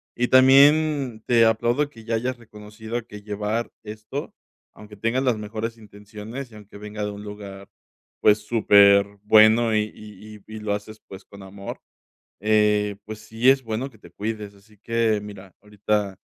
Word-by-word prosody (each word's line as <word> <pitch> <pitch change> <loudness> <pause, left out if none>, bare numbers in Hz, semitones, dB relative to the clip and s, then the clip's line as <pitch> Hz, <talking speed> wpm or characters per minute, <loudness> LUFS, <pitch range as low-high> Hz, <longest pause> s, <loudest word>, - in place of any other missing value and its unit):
y 120 +1 0
también 135 -2 +4
te 115 -2 +4
aplaudo 120 +6 +1
que 115 -5 -15
ya 115 0 -1
hayas 125 +3 -2
reconocido 110 +1 -8
que 105 -1 -11
llevar 105 +2 -3
esto, 110 +6 -7 0.4
aunque 105 0 -14
tengas 115 +5 -1
las 125 -4 +1
mejores 110 +2 -5
intenciones 105 +4 -10
y - - -15
aunque 105 -1 -13
venga 105 0 -7
de 105 - -4
un 100 0 -9
lugar, 100 -2 -10 0.5
pues 105 0 +5
superbueno 105 +1 +4
y 105 - +2
y 105 0 -13
y 110 - -10
y - - -6
lo 105 -1 -2
haces, 105 +1 -7
pues 95 0 -12
con 100 -1 -14
amor, 100 +1 -9 0.6
eh, 105 -1 +2
pues, 110 0 -8
sí 110 +3 +1
es 135 0 +3
bueno 115 +4 -4
que 115 - -21
te 85 - -16
cuides, 105 +1 -5
así 105 +2 -23
que 115 0 0
mira, 100 -3 -11
ahorita 105 -1 -2
110 Hz, 165 wpm, -23 LUFS, 105-115 Hz, 0.6 s, pues